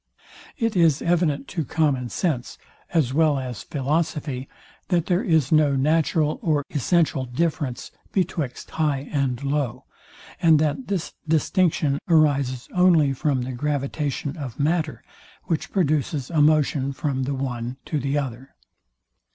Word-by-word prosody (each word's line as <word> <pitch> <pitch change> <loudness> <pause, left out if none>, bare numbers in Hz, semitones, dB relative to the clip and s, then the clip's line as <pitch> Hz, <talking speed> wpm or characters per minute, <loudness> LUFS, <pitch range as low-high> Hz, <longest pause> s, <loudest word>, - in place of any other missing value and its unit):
It 230 -5 0
is 165 -4 +3
evident 165 -5 +1
to 165 -4 -2
common 140 -3 0
sense, 140 -8 -2 0.3
as 150 -7 +1
well 155 -1 +3
as 125 -5 -5
philosophy, 145 -2 -2 0.4
that 175 -4 +1
there 180 0 +1
is 160 - +2
no 150 -3 +4
natural 155 +2 +1
nor 155 -8 +1
essential 155 -1 +1
difference 135 -1 -2 0.2
betwixt 165 -9 -2
high 145 -3 -1
and 135 -3 -1
low, 140 -3 -2 0.6
and 160 -2 +6
that 155 - 0
this 195 -5 -2
distinction 160 -2 +2
arises 140 -6 +2
only 170 -6 +4
from 135 -1 0
the 130 - -4
gravitation 145 +2 -2
of 135 -7 -7
matter, 155 +1 0 0.4
which 160 -3 -2
produces 150 - 0
a 160 -3 +3
motion 145 -2 +2
from 135 -2 -2
the 140 +1 -2
one 125 -2 -4
to 155 - -1
the 140 +2 -1
other. 135 -1 -5
150 Hz, 135 wpm, -24 LUFS, 135-160 Hz, 0.6 s, and